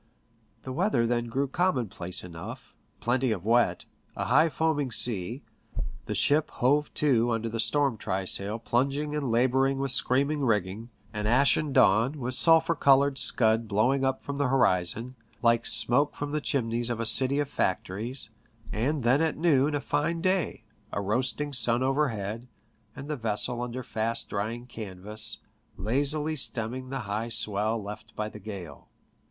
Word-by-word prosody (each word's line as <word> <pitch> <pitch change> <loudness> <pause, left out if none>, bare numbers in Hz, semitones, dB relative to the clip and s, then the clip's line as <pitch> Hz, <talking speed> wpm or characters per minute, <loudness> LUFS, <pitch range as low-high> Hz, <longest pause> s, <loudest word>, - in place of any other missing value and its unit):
The 130 - -6
weather 165 - +1
then 120 0 -1
grew 135 +4 -1
commonplace 125 - -2
enough, 90 +8 -9 0.2
plenty 120 +2 0
of 100 -3 -3
wet, 120 +2 +2 0.3
a - - -3
high 150 +7 +4
foaming 150 -2 -1
sea, 110 +2 0 0.6
the - - -3
ship 150 +2 +2
hove 145 +4 +1
to 120 -6 +3
under 115 0 -2
storm 140 -1 +2
trysail 100 +3 -1
plunging 140 +6 -1
and 145 -4 -2
labouring 130 +3 +2
with 135 -1 -1
screaming 140 +5 +2
rigging, 105 -1 -1 0.2
an 105 0 -2
ashen 140 +5 +3
dawn, 130 +3 +3
with 125 0 -1
sulphur 165 +4 +4
coloured 140 -2 +3
scud 110 -2 +2
blowing 120 +7 +1
up 135 0 -1
from 140 0 -5
the 140 -1 +1
horizon, 120 -1 +1 0.3
like 115 0 +3
smoke 120 +7 +4
from 145 0 -5
the 150 0 -1
chimneys 120 -3 0
of 120 -2 -3
a 115 - -2
city 130 +5 +4
of 145 -1 0
factories; 110 +1 -2 0.4
and 135 +5 -1
then 125 +6 +3
at 160 -1 0
noon 150 -3 +2
a - - 0
fine 165 +4 -1
day, 185 - -1 0.3
a - - -3
roasting 125 +8 -1
sun 120 0 +3
overhead, 120 -5 -1 0.5
and 135 - -8
the 150 - -2
vessel 120 0 -2
under 125 +1 -5
fast 115 -1 -2
drying 110 +4 -4
canvas, 105 -2 +1 0.4
lazily 145 +9 -1
stemming 130 -1 -2
the 135 0 -4
high 105 +2 -4
swell 110 0 +1
left 105 0 -9
by 105 - -3
the 105 - -10
gale. 95 -8 -9
120 Hz, 155 wpm, -27 LUFS, 110-140 Hz, 0.6 s, high